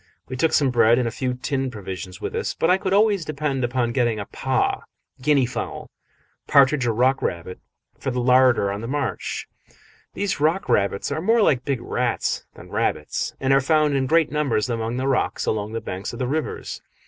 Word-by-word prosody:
We 130 - -5
took 160 +5 +2
some 140 -3 +3
bread 115 -1 +4
and 125 -2 +1
a - - -2
few 125 0 -2
tinned 135 0 -2
provisions 95 -4 -7
with - - -4
us, - - -2
but 165 - +2
I 185 - +3
could 190 - -2
always 205 -2 +3
depend 145 -3 -2
upon 120 -1 0
getting 120 -3 +1
a 100 - -4
paa, - - -1 0.4
guinea 140 -1 +3
fowl, 120 - -5 0.6
partridge 135 -2 +4
or - - +3
rock 130 +3 +2
rabbit 90 +1 -4 0.4
for - - -2
the 125 -1 -2
larder 125 -4 +4
on 100 +1 -4
the 115 - -5
march. 145 +2 -3 0.7
These 200 -5 -1
rock 160 +6 +1
rabbits 100 0 +1
are 155 - -2
more 225 +4 +3
like 130 -9 +2
big 135 -4 -1
rats 120 0 -1
than - - -13
rabbits, 75 - -1
and 135 0 +2
are 135 - +5
found 150 0 +2
in 135 -1 +1
great 165 +1 +3
numbers 130 -6 0
among 115 +1 -2
the 130 +1 -1
rocks 135 - 0
along 105 0 -2
the 115 - -2
banks 95 +4 -5
of - - -6
the 125 - -1
rivers. 155 +4 -3
130 Hz, 200 wpm, -23 LUFS, 115-150 Hz, 0.7 s, are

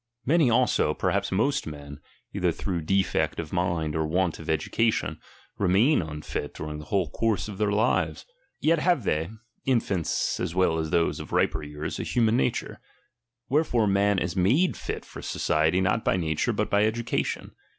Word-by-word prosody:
Many 155 -1 +4
also, 115 - +2
perhaps - - 0
most 135 - +1
men, 70 -2 -8 0.3
either - - +1
through 90 -4 -3
de 95 +5 +2
fect - - -1
of 80 -2 -6
mind 85 -4 0
or 80 - +1
want 90 +1 0
of 80 - -8
education, 110 +8 0 0.4
remain 100 - +4
unfit 75 -2 -5
during 75 0 -5
the 75 - -9
whole 95 0 0
• - - -24
course 110 -4 0
of 105 -2 -8
their 105 -1 +1
lives; 110 +4 +1 0.3
yet 165 +1 +3
have 175 -7 +2
they, 80 -2 0 0.4
infants 100 -9 0
as 85 - -3
well 90 -3 +2
as 80 -1 -2
tiose 85 -1 +1
of - - -8
riper - - +1
years, 75 0 -5
a - - -2
human 115 -2 +2
nature. 125 -1 -1 0.7
Wherefore 135 -6 +2
man 100 0 +2
is 85 -2 -1
made 125 - +3
fit - - -5
for - - -10
society 80 +4 +1
not 95 +4 +1
by - - +2
nature, 80 -3 0
but - - -2
by 100 +1 +4
education. 115 +2 -2
95 Hz, 175 wpm, -26 LUFS, 80-115 Hz, 0.7 s, Many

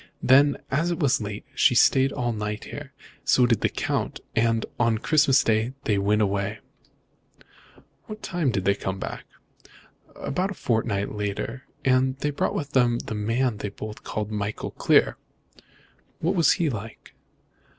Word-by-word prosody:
Then, 140 +2 +5
as 155 +5 +1
it 170 - -1
was 140 -7 +2
late, 105 0 -5
she - - +4
stayed 135 0 +5
here - - -9
all 120 -1 0
night. 105 -1 -4 0.6
So 125 - +4
did 115 -3 +2
the - - +2
Count, - - -2 0.2
and 115 0 +2
on 115 -2 +3
Christmas 140 +1 +3
Day 110 +3 +1
they 105 -2 +1
went 105 +2 +2
away." 100 +1 -1 1.5
"When 175 -8 -2
did 95 -6 -1
they 100 - +4
come 95 -1 -4
back?" - - -6 0.9
"About 180 +8 -2
a 200 - -5
fortnight 110 -6 -1
later, 105 +5 -4 0.2
and 130 0 +3
they 145 +1 -1
brought 140 - -1
with 145 -1 -3
them 120 -3 +3
the 110 - -5
man 115 +3 0
they 105 - -4
both 105 +2 -8
called 105 0 -4
Michael 105 0 -3
Clear." - - +3 1.0
"What 175 +5 0
is 165 - +5
he 170 - 0
like?" 110 -1 -8
115 Hz, 155 wpm, -25 LUFS, 105-135 Hz, 1.5 s, Then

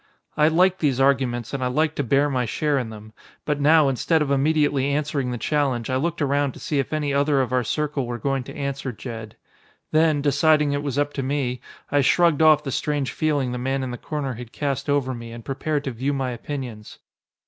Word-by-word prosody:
I 150 0 +4
liked 180 +3 +3
these 135 -5 +1
arguments 130 -4 +1
and 135 -2 -2
I - - +1
liked 155 +5 0
to 145 - +1
bear 140 +3 +3
my 130 -3 0
share 145 +4 0
in 120 -3 -4
them, 110 0 -11 0.3
but 150 -1 -1
now, 155 0 +5
instead 135 +5 +1
of 140 - -3
immediately 145 -1 +2
answering 145 -2 -1
the 125 - -3
challenge, 130 -2 0
I - - +1
looked 165 +3 -1
around 140 -1 +1
to - - -12
see 145 - -1
if 135 - -2
any 150 -2 -1
other 140 0 +2
of 130 -1 -1
our 125 -1 +2
circle 145 +1 -2
were 120 0 -3
going 135 +2 -1
to - - -9
answer 140 -2 -3
Jed. 110 -2 -8 0.6
Then, 155 -1 +3
deciding 150 +1 +3
it 145 0 -1
was 140 -2 -3
up 145 0 0
to 135 - -2
me, 130 -2 -2 0.3
I 145 0 +4
shrugged 165 +2 +3
off 155 -1 +6
the 135 - -4
strange 145 0 -1
feeling 145 -5 0
the 125 - -3
man 135 +2 -1
in 130 - -4
the 125 - -5
corner 145 -4 -3
had 120 0 -9
cast 140 0 -3
over 140 -2 +1
me, 115 -1 -8
and 115 0 -10
prepared 145 +2 -2
to 135 - -3
view 130 +5 -2
my 135 -2 -2
opinions. 120 -3 -7
140 Hz, 225 wpm, -23 LUFS, 125-150 Hz, 0.6 s, off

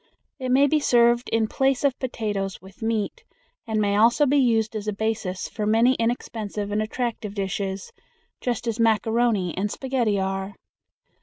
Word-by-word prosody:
It 255 -1 -3
may 265 +3 +5
be 305 +2 +2
served 240 -3 +3
in 225 -1 +1
place 270 +3 +1
of 275 -2 +1
potatoes 210 -6 -3
with 190 +3 -16
meat, 225 - -2 0.4
and 220 -1 0
may 200 -1 +1
also 235 +7 +4
be 285 +1 +3
used 225 -3 +2
as 215 -1 -4
a 210 - 0
basis 215 -3 -2
for 210 -2 -4
many 230 +4 +4
inexpensive 220 -4 -3
and 210 +1 +1
attractive 215 -2 -3
dishes, 195 0 -3 0.5
just 245 -1 -2
as 230 -1 -2
macaroni 225 -4 +2
and 205 +2 -1
spaghetti 240 -5 0
are. 195 +1 -3
220 Hz, 160 wpm, -24 LUFS, 205-245 Hz, 0.5 s, may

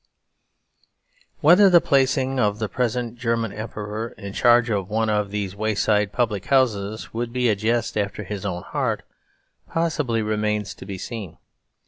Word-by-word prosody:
Whether 180 +6 +7
the 175 -2 +7
placing 135 -2 +1
of 105 -3 +2
the 110 0 -2
present 120 +1 -2
German 115 -3 -1
Emperor 110 +1 -5
in 100 -2 -7
charge 120 0 +4
of 100 -2 -1
one 110 +1 +1
of 105 -1 0
these 100 -2 -3
wayside 105 -1 +1
public 110 -5 -1
houses 110 -6 0
would 115 +1 -3
be 125 -1 +1
a 105 - +3
jest 115 +3 0
after 105 0 -2
his 100 0 -6
own 90 -3 -3
heart - - -2 0.7
possibly 150 -9 0
remains 105 -1 -1
to - - -12
be 100 -2 -5
seen. 105 -4 -7
110 Hz, 150 wpm, -23 LUFS, 105-120 Hz, 0.7 s, Whether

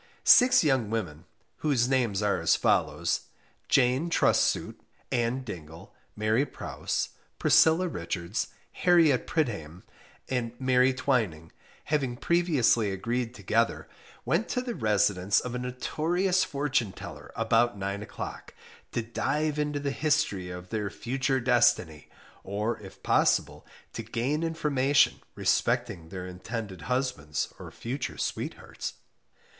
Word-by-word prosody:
Six 250 -5 +7
young 130 -8 +2
women, 85 -8 -4 0.3
whose 135 -6 +1
names 120 -7 +1
are 100 -1 +1
as - - +4
follows: - - +1 0.4
Jane 130 +5 +3
Trustsoot, - - +2 0.3
Ann 120 +1 0
Dingle, 85 -4 -9 0.2
Mary 110 +4 +2
Prause, 140 - -3 0.3
Priscilla 165 +3 +5
Richards, 85 - -3 0.2
Harriett 165 -7 +3
Pridhame, 95 - -2 0.4
and 120 -2 -3
Mary 130 0 +4
Twining, 115 - -1 0.3
having 135 -5 -1
previously 150 - +2
agreed 120 +5 -2
together, 115 +3 0 0.4
went 185 +8 +1
to 250 - 0
the 250 -1 -4
residence 100 - +2
of 125 - -5
a 125 - -2
notorious 170 +9 0
fortune 140 - -1
teller - - -10
about 115 0 +2
nine 100 +1 -3
o'clock, 105 - -7 0.4
to 120 - -1
dive 140 +7 -1
into 150 -1 -1
the 140 0 -2
history 145 - 0
of 90 0 -8
their 105 -1 -2
future 130 +4 -1
destiny, 120 - +2 0.3
or 105 +4 -2
if 95 -3 -13
possible, - - +2 0.3
to - - -4
gain 120 +7 -1
information 145 -4 +2
respecting 80 -1 0
their 95 -1 -6
intended 95 0 -6
husbands 125 - -1
or - - -8
future 125 +3 -5
sweethearts. - - -4
120 Hz, 120 wpm, -28 LUFS, 100-140 Hz, 0.4 s, Six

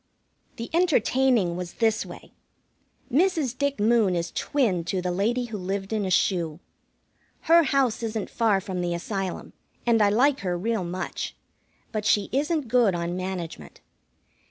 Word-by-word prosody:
The 230 - -7
entertaining 260 - +2
was 180 -1 -5
this 225 -2 +1
way. - - -11 0.8
Mrs. 315 -4 +2
Dick 280 -1 -1
Moon 215 -3 +3
is 170 0 -2
twin 220 -12 0
to 185 +2 -1
the 180 0 -2
lady 230 +7 0
who 220 -3 -6
lived 195 +2 -3
in 210 -2 0
a - - -1
shoe. 170 -4 +1 0.8
Her 335 +1 +6
house 265 -6 +1
isn't 220 -2 -3
far 220 -4 +2
from 185 -2 -4
the 175 -1 -1
Asylum, 190 +1 -4 0.3
and 230 -2 +3
I 205 - +5
like 265 +7 +3
her 180 -2 -2
real 220 +2 -1
much; 180 +1 -4 0.6
but 215 -2 -2
she 205 -1 +2
isn't 295 +1 0
good 225 -5 +3
on 170 0 -2
management. 185 -2 -6
215 Hz, 155 wpm, -25 LUFS, 185-250 Hz, 0.8 s, Her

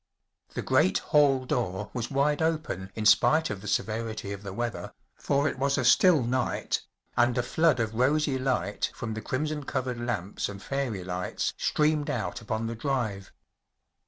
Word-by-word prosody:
The - - -2
great 95 - +3
hall 140 -3 +3
door 105 -5 -2
was 120 -1 -3
wide 145 +2 +1
open 155 - -1
in 110 - -3
spite 155 +8 +5
of 100 -2 -5
the 105 - -8
severity 110 -1 -2
of 100 - -8
the 100 -1 -6
weather, 120 +3 -4 0.2
for 140 +1 0
it 130 - -3
was 140 +1 +1
a 130 - 0
still 165 0 +6
night, 125 +2 -1 0.3
and 120 0 +3
a 125 - +2
flood 160 +1 +2
of 115 -1 -1
rosy 135 +3 +2
light 130 -6 -1
from 110 -2 -4
the 110 - -5
crimson 150 +5 -2
covered 130 -3 -3
lamps 105 -6 -2
and 100 -1 -7
fairy 125 -5 -3
lights 90 0 -2
streamed 150 -1 +1
out 120 - -3
upon 110 +1 -2
the 115 - -3
drive. 110 -7 -2
120 Hz, 170 wpm, -28 LUFS, 105-140 Hz, 0.3 s, still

